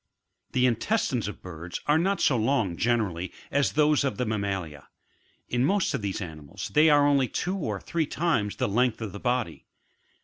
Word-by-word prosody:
31. 125 - +2
The 125 -2 +4
intestineg 130 - 0
of 105 - -7
birds 85 -1 -7
are 150 +2 +3
not 195 +3 +1
so 145 -5 +3
long, 115 -6 +1
generally, 100 -6 0 0.2
as 140 0 +1
those 150 -1 +3
of 140 - -1
the 125 - 0
mammalia; 95 -9 -3 0.6
in 125 0 0
most 190 +2 +2
of 135 - -2
these 100 +1 -3
animals 75 -5 -7
they 155 +2 +6
are 145 -1 +5
only 140 -2 +3
two 180 - -2
or 110 - -3
three 160 - -2
times 145 -13 0
the - - 0
length 120 +3 +1
of 110 -3 -5
the 100 - -8
body. 120 -7 -2
120 Hz, 190 wpm, -27 LUFS, 100-145 Hz, 0.6 s, they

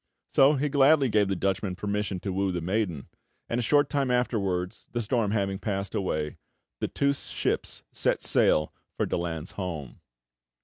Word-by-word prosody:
So 140 +3 +6
he 145 +2 0
gladly 140 -1 +4
gave 105 -2 +3
the 95 - 0
Dutchman 95 0 -1
permission 105 -1 -2
to 95 - -3
woo 95 0 0
the 90 - -2
maiden; 90 -4 -2 0.4
and 120 - -1
a - - +1
short 145 +4 +3
time 140 -3 0
afterwards, 100 -7 -1
the 120 - 0
storm 115 -1 +1
having 100 -2 0
passed 100 -2 -3
away, 75 -6 -2 0.4
the - - -1
two 140 0 +1
ships - - -3
set - - +1
sail 75 0 +3 0.2
for - - +1
Daland's 85 -1 -3
home. 80 -9 -6
100 Hz, 165 wpm, -27 LUFS, 90-125 Hz, 0.4 s, So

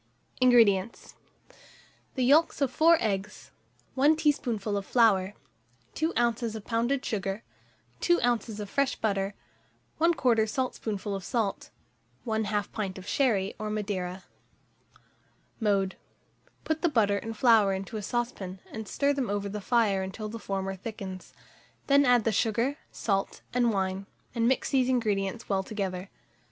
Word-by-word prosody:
INGREDIENTS. 230 -5 +3 1.0
The 255 -3 +1
yolks 310 +7 +4
of 275 -3 +1
4 330 +4 +5
eggs, 210 -1 -3 0.4
1 285 +4 +4
teaspoonful 240 -9 0
of 200 - -1
flour, 205 -4 +3 0.6
2 320 +1 0
oz. 235 -1 0
of 215 - -7
pounded 240 +4 0
sugar, 195 0 -3 0.6
2 345 0 +3
oz. 235 -3 0
of 205 - -4
fresh 275 +5 0
butter, 200 -2 -1 0.6
1/4 250 -10 +3
saltspoonful 215 -5 -3
of 195 -1 -4
salt, 220 -4 -2 0.6
1/2 215 -2 -1
pint 195 -4 -4
of 190 0 -10
sherry 210 -8 +1
or 215 0 -3
Madeira. 195 -3 -3 1.4
Mode. 200 -4 +1 0.7
Put 315 0 -1
the 345 - +3
butter 205 -7 +2
and 225 +1 -7
flour 225 -5 +5
into 195 +3 -4
a 215 - -3
saucepan, 205 -5 -3
and 220 -1 -6
stir 280 +6 +1
them 270 -5 -2
over 205 0 -1
the 210 +1 -5
fire 210 -3 +2
until 190 +3 -5
the 230 +1 -6
former 195 -2 -3
thickens; 190 -2 -7 0.5
then 280 0 +5
add 245 -3 +4
the 225 - +1
sugar, 230 +6 0
salt, 195 -3 -2
and 240 -1 +3
wine, 190 -1 -2 0.3
and 230 -1 +1
mix 260 0 +1
these 260 -2 +3
ingredients 215 -3 0
well 195 -1 +1
together. 190 -2 -4
220 Hz, 140 wpm, -28 LUFS, 195-245 Hz, 1.4 s, 4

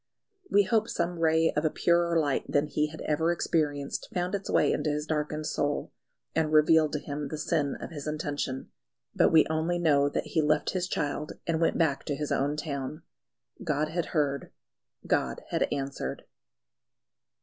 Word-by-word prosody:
We 205 - +5
hope 220 +2 +1
some 175 0 -2
ray 160 0 +3
of 150 - +1
a 155 - +3
purer 170 +1 +2
light 145 -4 0
than 145 +1 +3
he 150 0 0
had 155 +1 -9
ever 160 +2 +1
experienced 145 -4 -1
found 180 +1 -2
its 200 -1 -3
way - - +3
into 150 +1 -1
his 150 0 -1
darkened 155 0 -2
soul, 145 -1 -1 0.4
and 160 -1 +1
revealed 155 0 +5
to 150 - 0
him 145 0 -5
the 155 - -5
sin 150 -1 0
of - - -7
his 150 -2 -7
intention. 145 -3 -3 0.4
But - - +4
we 160 -1 +6
only 160 +2 0
know 145 -4 +3
that - - -2
he 160 - +3
left 150 0 +2
his 180 -1 -1
child 150 -2 -2
and 165 -1 0
went 165 - +2
back 155 -5 +1
to 145 - -1
his 150 +1 -4
own 145 +2 +1
town. 145 -1 -4 0.6
God 155 -3 0
had 170 +1 -2
heard: 140 -3 -1 0.5
God - - 0
had - - 0
answered. 140 -1 -3
155 Hz, 175 wpm, -28 LUFS, 145-165 Hz, 0.6 s, we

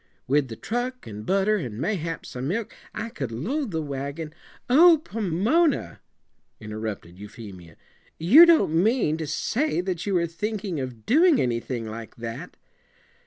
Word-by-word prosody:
With 140 +1 +2
the 115 - -7
truck 245 - -4
and 105 0 -8
butter, 195 +2 +2
and 120 - -5
mayhap 165 - -3
some 125 +1 -5
milk, 210 +7 -3 0.2
I 230 - -5
could 135 - -5
load 245 - -2
the 160 -4 -2
wagon 140 +2 -5 0.2
'" - - -26
"Oh, 325 +6 +7
Pomona," 225 - 0 0.6
interrupted 105 -5 -6
Euphemia, 100 -6 -11 0.4
"you 260 - +8
don't 325 - +4
mean 210 -7 +2
to 160 -2 -4
say 250 - -1
that 180 -2 -2
you 195 - +1
were 170 -1 +2
thinking 195 0 -4
of 125 -4 -6
doing 320 +4 +5
anything 120 -1 -2
like 110 +1 -8
that?" 120 +8 -7
160 Hz, 150 wpm, -25 LUFS, -, 0.6 s, you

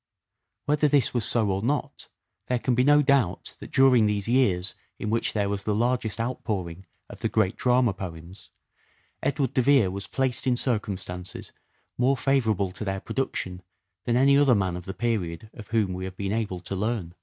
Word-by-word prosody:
Whether 150 +1 +2
this 140 -2 +2
was 120 -3 0
so 110 -3 +1
or 95 +1 -1
not, 140 +7 -2 0.4
there 125 - +1
can 125 +1 0
be 125 +1 +3
no 145 +2 +5
doubt 135 -9 +1
that - - -10
during 130 -5 +5
these 105 -1 -1
years 100 -8 +2 0.2
in 105 - -3
which 115 - 0
there 105 -2 0
was 100 0 -2
the 105 - 0
largest 120 -1 0
outpouring 95 -7 -4 0.2
of - - -11
the - - -1
great 105 -1 +1
drama 125 -3 +2
poems, 90 0 -9 0.7
Edward 140 -1 0
de 130 - +3
Vere 130 -7 +4
was 100 0 -6
placed 130 -1 -1
in 125 - +3
circumstances 95 -7 -3 0.5
more 130 +2 +3
favourable 110 -9 +1
to 100 - -5
their 95 -1 -2
production 95 -7 -3 0.4
than 120 - +1
any 140 +2 +5
other 140 -3 +5
man 95 -3 0
of 90 0 -7
the 95 - -6
period 110 -4 -2
of 105 -3 -11
whom 110 -5 0
we 95 0 -5
have 95 0 -8
been 100 0 -2
able 105 -5 -2
to 95 +2 -5
learn. 100 -4 -2
110 Hz, 190 wpm, -26 LUFS, 95-125 Hz, 0.7 s, no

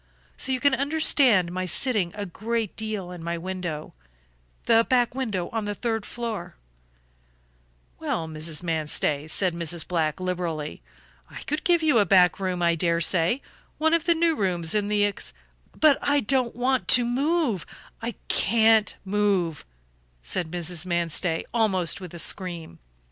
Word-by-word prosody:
So 265 - 0
you 260 - 0
can 285 +1 +3
understand 270 - +3
my 185 +1 -3
sitting 210 -4 +2
a 205 -1 -4
great 220 +3 -3
deal 215 -5 -4
in 175 -2 -9
my 170 0 -3
window 175 -3 -5 0.7
the 230 -1 +5
back 245 -1 +1
window 215 -10 -2
on 225 -2 -3
the 205 0 -3
third 225 -1 -2
floor 220 -8 -5 0.7
" - - -38
"Well, 160 - -2
Mrs. 155 +1 -4
Manstey," 155 -2 -1
said 185 +2 +1
Mrs. 170 0 -2
Black, 160 -3 -1
liberally, 170 - -3 0.5
"I - - -9
could 300 +2 -3
give 345 -2 +2
you 295 -7 +4
a 205 - +4
back 180 -1 +5
room, 185 -2 -2
I 170 0 +3
dare 170 0 +1
say; 170 +8 +2 0.3
one 320 +1 +2
of 335 -1 +2
the 340 -1 +3
new 330 0 +2
rooms 175 - 0
in 210 -1 0
the 205 0 +2
ex 205 - -4 0.2
" - - -26
"But 305 -3 +5
I 285 0 +2
don't 255 0 0
want 255 +1 0
to 245 -1 +6
move; 265 - 0 0.3
I 230 0 -4
can't 225 -2 +3
move," 195 -6 0 0.6
said 160 - -1
Mrs. 175 -1 0
Manstey, 170 -1 0
almost 195 -6 +1
with 180 -2 -9
a - - -6
scream. 170 - -2
190 Hz, 160 wpm, -25 LUFS, 170-235 Hz, 0.7 s, to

